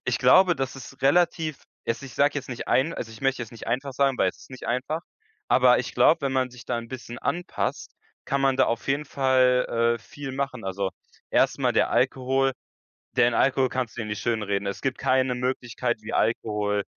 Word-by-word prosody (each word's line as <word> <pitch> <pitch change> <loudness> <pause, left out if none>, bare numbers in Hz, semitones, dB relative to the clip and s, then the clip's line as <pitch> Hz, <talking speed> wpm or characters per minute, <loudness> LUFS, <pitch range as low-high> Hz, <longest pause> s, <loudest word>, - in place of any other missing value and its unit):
ich - - 0
glaube, 185 -2 +5
dass 135 0 -3
es 135 0 -11
relativ 155 0 +2 0.2
es 115 +4 -2
ich 135 - -9
sage 145 +1 +3
jetzt 145 -3 -4
nicht 120 -2 -6
ein 150 +6 +2
also, 115 - -6
ich 110 - -13
möchte 135 -2 0
jetzt 115 - -9
nicht 115 - -10
einfach 135 +4 -1
sagen, 135 -1 +1
weil - - +3
es - - -23
ist - - -16
nicht 130 - -9
einfach, 130 +7 -2 0.5
aber - - +5
ich - - -4
glaube, - - +4
wenn 135 - 0
man 130 -1 +1
sich 125 0 -13
da - - -2
'n 115 0 -8
bisschen 120 -2 -8
anpasst, 175 0 -3 0.3
kann 140 - -1
man 135 -1 +2
da 130 - +5
auf 115 +3 -2
jeden 140 +2 +1
Fall, 125 -4 +2
äh, - - -13
viel 145 -2 -8
machen. 135 -4 -3
Also, 95 0 -2 0.4
erstmal - - +2
der - - +3
Alkohol 130 +2 +1 0.6
den 120 0 +4
Alkohol 130 -1 +3
kannst 125 -3 -3
du - - -2
ja 110 - -5
nicht 105 -1 -4
schönreden. 105 -4 -1
Es 100 - -4
gibt 135 - -1
keine 130 -1 +2
Möglichkeit, 125 -3 -2
wie 105 - -7
Alkohol 105 -2 0
130 Hz, 210 wpm, -25 LUFS, 115-135 Hz, 0.6 s, glaube